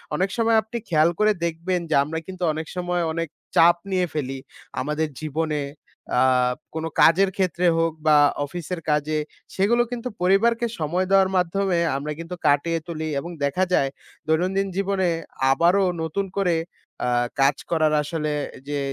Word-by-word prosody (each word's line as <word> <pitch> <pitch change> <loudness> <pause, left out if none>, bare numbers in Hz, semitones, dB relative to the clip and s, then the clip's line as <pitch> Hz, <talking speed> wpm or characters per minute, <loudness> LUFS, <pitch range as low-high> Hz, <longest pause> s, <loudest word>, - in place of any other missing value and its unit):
অনেক 190 +4 0
সময় 225 -1 +3
আপনি 220 +2 -6
খেয়াল 155 0 +4
করে 215 0 +4
দেখবেন 170 +2 -1
যে, - - +2
আমরা 160 +2 -4
কিন্তু 185 -1 -6
অনেক 160 0 -5
সময় 180 -1 -1
অনেক 165 0 -2 0.3
চাপ 170 +1 +7 0.2
নিয়ে 185 -1 +2
ফেলি, 135 -3 -3 0.4
আমাদের 150 +3 -1
জীবনে। 155 0 -2 0.6
আ - - +4 0.5
কোন 160 - -3 0.2
কাজের 190 +4 +5
ক্ষেত্রে 180 -1 0
হোক, 165 0 +2 0.2
বা 150 -1 +7 0.3
অফিসের 170 +3 -6
কাজে, 150 +1 0 0.4
সেগুলো 230 +5 +3
কিন্তু 245 0 -4
পরিবারকে 230 +6 +3
সময় 175 +5 0
দেওয়ার 195 -1 +5
মাধ্যমে 180 0 +1 0.2
আমরা 150 +2 -4
কিন্তু 165 +2 -6
কাটিয়ে 165 +4 +2
তুলি, 160 -2 -4
এবং 170 +4 -7
দেখা 160 +7 0
যায় 135 - +3 0.4
দৈনন্দিন 185 +5 +1
জীবনে 195 -2 +1 0.4
আবারো 175 +7 +3 0.2
নতুন 180 +5 -2
করে 180 -4 +2 0.5
আ - - +1 0.3
কাজ 135 0 +4 0.2
করার 155 -2 +2
আসলে 155 0 -2 0.4
যে 145 -1 -1
170 Hz, 150 wpm, -23 LUFS, 155-190 Hz, 0.6 s, চাপ